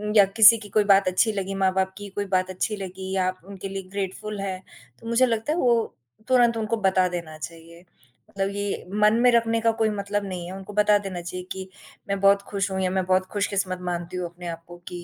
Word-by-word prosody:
या 205 -2 +8
किसी 225 +1 +9
की 210 -1 -11
कोई 210 +2 +3
बात 195 -1 +5
अच्छी 185 +5 +3
लगी, 195 -1 -3
माँ-बाप 190 0 +1
की 205 -1 -8
कोई 205 - -1
बात 185 0 +1
अच्छी 185 +3 -2
लगी, 190 0 -6
आप 185 -1 0
उनके 195 0 -7
लिए 195 0 -5
ग्रेटफुल 200 +1 -4
है, 190 -1 -4 0.4
तो 230 - -11
मुझे 235 +2 +4
लगता 230 +4 -1
है - - -2
वो 240 -5 +4 0.5
तुरंत 240 -2 +4
उनको 225 +1 -1
बता 185 -1 +3
देना 170 -3 -6
चाहिए, 165 +2 -10 0.4
मतलब 195 0 -2
ये 205 -2 -3 0.2
मन 210 +1 +6
में 250 - +6
रखने 230 -1 +2
का 230 - +3
कोई 220 - +3
मतलब 205 0 -2
नहीं 180 -3 -5
है, 180 - -7
उनको 195 +2 -10
बता 210 0 +4
देना 180 -2 -5
चाहिए 180 +1 -6
कि, 190 0 -6 0.4
मैं 200 0 0
बहुत 200 0 +5
खुश 200 -1 -1
हूँ 190 0 -1
या 185 - +1
मैं 190 -1 0
बहुत 185 0 +2
खुश 205 -1 0
किस्मत 185 -2 -2
मानती 175 +1 -4
हूँ 180 - -2
अपने 175 0 -9
आप 165 0 -6
को 175 0 -11
कि 175 -1 -7
195 Hz, 230 wpm, -24 LUFS, 185-210 Hz, 0.5 s, किसी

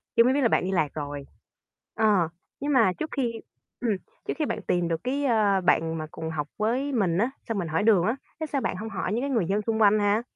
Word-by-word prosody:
chú 230 - +7
mới 255 +2 +3
biết 285 - +1
là 245 - +5
bạn - - +2
đi 185 - -1
lạc 155 -6 +1
rồi. 145 -2 -5 0.7
Ờ, 205 -7 +3 0.3
nhưng 290 +1 -1
mà 225 -8 +4
trước 310 - -3
khi 235 -5 -1 0.4
ừm, 225 -5 +1 0.3
trước - - 0
khi 305 - +2
bạn - - -3
tìm 175 -1 +1
được 165 +1 -2
cái, 280 +3 -1
ơ, 210 -6 +3
bạn 165 -2 +2
mà 155 -1 -4
cùng 160 - -5
học 150 -2 -3
với 245 +7 0
mình 195 -10 +1
á, 230 +6 +2 0.2
xong 225 - -1
mình 175 - -2
hỏi 160 +4 0
đường 210 -5 +5
á, 225 - +1 0.2
thế 315 - -2
sao 280 -3 -2
bạn - - -1
hông 220 +3 -5
hỏi 190 -2 -3
cái 280 - -2
người 230 -9 +1
dân 200 +3 +1
xung 220 +1 -1
quanh 215 0 +6
ha? 205 +2 +2
210 Hz, 255 wpm, -26 LUFS, 175-240 Hz, 0.7 s, chú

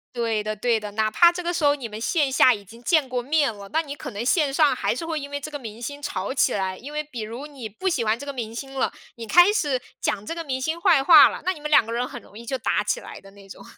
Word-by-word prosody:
对 225 -3 -1
的 215 0 -3
对 230 +2 +1
的， 210 -1 -7
哪 215 +1 0
怕 345 +9 +6
这 355 +1 -6
个 345 +1 -1
时 330 - -2
候 290 0 +4
你 265 -5 -6
们 215 -1 -8
线 290 +2 +1
下 260 -1 +6
已 205 -3 -7
经 230 +5 -15
见 310 0 +2
过 250 -1 -2
面 285 -1 +1
了， 200 -1 -11
那 320 - +2
你 285 -2 -7
可 - - -7
能 210 +3 -5
线 285 +2 +2
上 290 -2 +3
还 - - -1
是 330 - -5
会 325 -1 -2
因 285 0 -7
为 285 0 -4
这 305 +2 -8
个 290 - -5
明 225 -3 -9
星 285 +4 -6
吵 200 -4 -3
起 265 -2 +2
来。 190 -2 -2
因 280 +5 -10
为 300 0 -2
比 265 -6 -8
如 230 +6 -6
你 270 -6 -8
不 220 - -5
喜 265 -9 0
欢 220 0 +1
这 285 - -9
个 280 - -5
明 230 -4 -5
星 270 +2 -7
了， 265 - 0 0.2
你 230 -1 -8
开 350 - +6
始 295 -11 0 0.2
讲 210 0 -1
这 330 - -4
个 335 0 -5
明 265 -4 -3
星 320 +5 -2
坏 340 -8 +4
话 335 - +9
了， - - -7
那 370 - +1
你 320 - -13
们 300 0 -5
两 295 - +5
个 225 - -7
人 245 +1 -1
很 - - -9
容 205 - -16
易 235 - -10
就 265 +3 -2
打 215 -3 0
起 210 - -1
来 - - -11
的 195 - -16
那 200 0 -16
种。 195 - -12
260 Hz, 340 characters per minute, -24 LUFS, 220-300 Hz, 0.2 s, 话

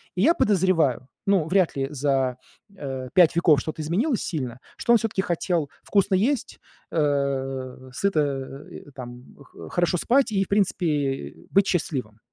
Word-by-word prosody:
И 180 - 0
я 320 - +5
подозреваю, 170 - +2 0.2
ну, 195 -5 +3
вряд 185 -1 +2
ли 135 0 0
за, 135 -3 0 0.4
э, 135 -6 -5
5 175 -3 +5
веков 160 -5 +5
что-то 155 0 -5
изменилось 210 - 0
сильно, 130 -7 -4 0.2
что - - 0
он - - +7
всё-таки 215 -4 -1
хотел 170 -4 -1
вкусно 200 -1 +2
есть, 240 +7 0 0.3
э, 135 -3 -1
сыто, 195 +5 +1
э, 140 0 -4
там, 125 -1 -9 0.2
х 140 - -12
хорошо 175 0 +1
спать 250 +7 +2
и, 195 -1 +2
в - - -10
принципе, 160 -9 0 0.2
быть 195 0 +4
счастливым. 130 - -2
155 Hz, 150 wpm, -24 LUFS, 135-190 Hz, 0.4 s, он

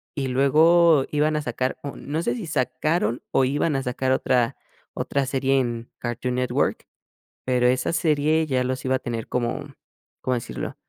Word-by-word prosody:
y 140 -3 -2
luego 155 +3 +5
iban 150 +1 +1
a 150 - 0
sacar, 125 0 -2
o 140 - -5
no 150 +3 -3
sé - - 0
si 220 -8 -6
sacaron 130 0 0
o 130 - +3
iban 145 +3 0
a 135 - -1
sacar 130 +1 -1
otra 125 -2 +1 0.4
otra 140 -1 -1
serie 135 0 +1
en 120 -2 -3
Cartoon 120 +1 -3
Network, 125 0 0 0.6
pero 125 -1 +2
esa 125 +1 +1
serie 155 -1 +2
ya 130 -3 +1
los 130 +1 -3
iba 130 0 +2
a - - -1
tener 115 -2 -4
como, 120 -1 -2 0.5
¿cómo 130 - 0
decirlo? 60 - -5
130 Hz, 170 wpm, -24 LUFS, 125-150 Hz, 0.6 s, luego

